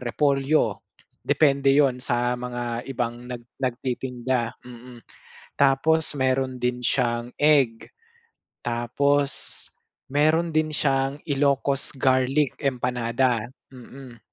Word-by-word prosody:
repolyo, 140 +4 +1 0.4
depende 140 -2 +2
'yun 135 -2 +3
sa 120 -1 0
mga 120 0 -4
ibang 120 -1 -4
nag 120 -1 -7 0.2
nagtitinda, 125 -1 -2
mm. 125 -1 -12 0.5
Tapos 145 +3 +2
meron 130 0 0
din 125 0 -1
siyang 120 -1 0
egg. 140 -7 +3 0.8
Tapos 135 +4 +1 0.8
meron 155 +4 +2
din 155 0 +1
siyang 135 -1 0
Ilocos 140 -1 0
garlic 130 +2 +1
empanada, 125 -2 0 0.3
mm. 130 -1 -12
130 Hz, 90 wpm, -24 LUFS, 120-140 Hz, 0.8 s, yun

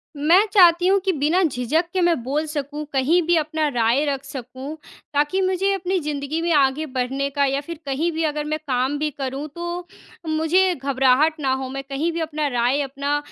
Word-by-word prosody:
मैं 330 +8 +4
चाहती 355 -3 +6
हूँ 395 +1 +4
कि 385 - +3
बिना 310 +5 +1
झिझक 300 +2 0
के 375 - +1
मैं 345 -1 +3
बोल 290 +5 -1
सकूँ, 295 0 -4
कहीं 285 +7 +3
भी 345 - +4
अपना 310 0 0
राय 245 +2 +1
रख 275 -2 -2
सकूँ, 260 +2 -7 0.4
ताकि 295 +6 +1
मुझे 375 +1 +1
अपनी 375 0 -1
ज़िंदगी 295 0 -3
में 340 0 0
आगे 280 +2 +2
बढ़ने 265 0 -2
का 280 0 +1
या 275 +1 0
फिर 330 +2 -8
कहीं 290 +5 -1
भी 325 0 -2
अगर 300 -1 -1
मैं 310 +1 -2
काम 260 +2 0
भी 305 0 0
करूँ, 275 +1 -5
तो 345 +3 -6 0.4
मुझे 320 +4 +2
घबराहट 275 +3 +2
ना 270 -3 +1
हो। 265 0 -3
मैं 275 +1 -5
कहीं 280 +5 -2
भी 335 - -4
अपना 305 -2 -2
राय, 250 +2 +1
अपना 280 +1 -2
295 Hz, 200 wpm, -22 LUFS, 275-335 Hz, 0.4 s, चाहती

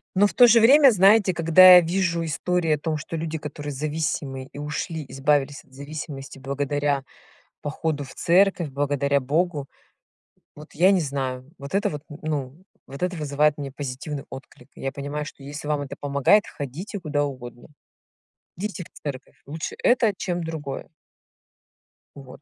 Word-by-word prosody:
Но 205 +2 +5
в - - -8
то 245 - +7
же 230 0 +6
время, 270 +3 +7
знаете, 200 -1 +5
когда 175 +2 +8
я 180 - +9
вижу 170 -1 0
истории 165 +1 -1
о - - +1
том, 155 +1 -2
что 155 +2 -7
люди, 160 0 -3
которые 145 0 -6
зависимые 145 -2 -3
и - - -12
ушли, 150 +1 -4
избавились 140 0 0
от 130 - -29
зависимости 140 -1 -8
благодаря 140 +1 -1 0.6
походу 150 0 -2
в 130 - -12
церковь, 175 -3 +2
благодаря 140 0 0
Богу, 150 +2 -1 0.9
вот 150 +1 -13
я 180 +5 +4
не 190 - +3
знаю. 135 -3 -3
Вот 140 +5 -6
это 200 - +1
вот, 150 -2 -6
н 145 - -9
ну, 150 +1 -4 0.2
вот 140 +3 -10
это 180 0 -1
вызывает 150 -1 +1
мне 140 -2 -5
позитивный 140 +1 -6
отклик. 135 -2 -11
Я 135 - -4
понимаю, 145 +1 -5
что 140 -1 -11
если 145 +2 -7
вам 150 -1 0
это 140 - -6
помогает, 145 +9 +3
ходите 165 - -6
куда 150 -3 -1
угодно. 120 -4 -7 0.9
Идите 195 -2 -5
в - - -18
церковь. 140 -3 -7
Лучше 155 +3 -5
это, 240 -4 +3
чем 175 -3 -3
другое. 155 -4 -6 1.3
Вот. 135 -1 -12
150 Hz, 160 wpm, -24 LUFS, 140-170 Hz, 1.3 s, я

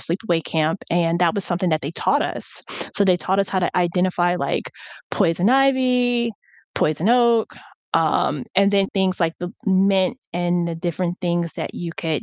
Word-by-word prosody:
sleepaway 170 -2 -1
camp, 160 +3 -1
and 170 0 +1
that 170 -2 +3
was 200 - -3
something 180 +1 -1
that 155 -2 0
they 145 - -3
taught - - +1
us. - - -5 0.5
So 200 - +3
they 185 -2 +4
taught 190 +4 -1
us 195 - +1
how 190 - -1
to 175 - -1
identify, 175 0 +1
like, - - -2 0.4
poison 175 +1 +2
ivy, 250 -3 +2 0.4
poison 155 +6 0
oak, 235 -2 +3 0.4
um, 155 -3 +1
and 200 0 +5
then 195 -1 +3
things 190 -1 0
like 165 -1 +1
the 175 - -4 0.2
mint 190 +2 +2 0.2
and 175 0 0
the 165 - -3
different 175 +1 -3
things 170 -2 -1
that - - -5
you 170 -1 -5
could, 160 -3 -2
180 Hz, 175 wpm, -21 LUFS, 170-200 Hz, 0.5 s, and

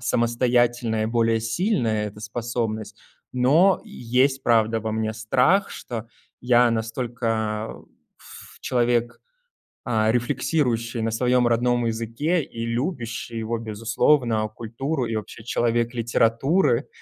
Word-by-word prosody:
самостоятельная 120 -2 +1
и - - 0
более 115 -1 +1
сильная, 115 - 0
эта 105 +1 -13
способность, 115 -1 -4 0.4
но 150 +10 +4
есть, 135 - 0
правда, 115 -1 +2
во 110 0 -3
мне 110 0 -1
страх, 125 - +2
что 115 -2 -6 0.3
я 120 0 +4
настолько, 115 -1 -2 0.4
пф, - - -14
человек, 120 -1 0 0.7
а, 110 -2 +2
рефлексирующий 120 -2 0
на 115 0 -1
своём 125 +1 +2
родном 120 0 +1
языке 115 +10 -1
и 115 -2 -6
любящий 120 -2 -3
его 115 +1 -2
безусловно, 115 +1 +1
культуру 120 +5 -3
и 115 - -3
вообще 110 +1 -6
человек 120 0 0
литературы, 120 - +2
115 Hz, 115 wpm, -24 LUFS, 115-125 Hz, 0.7 s, но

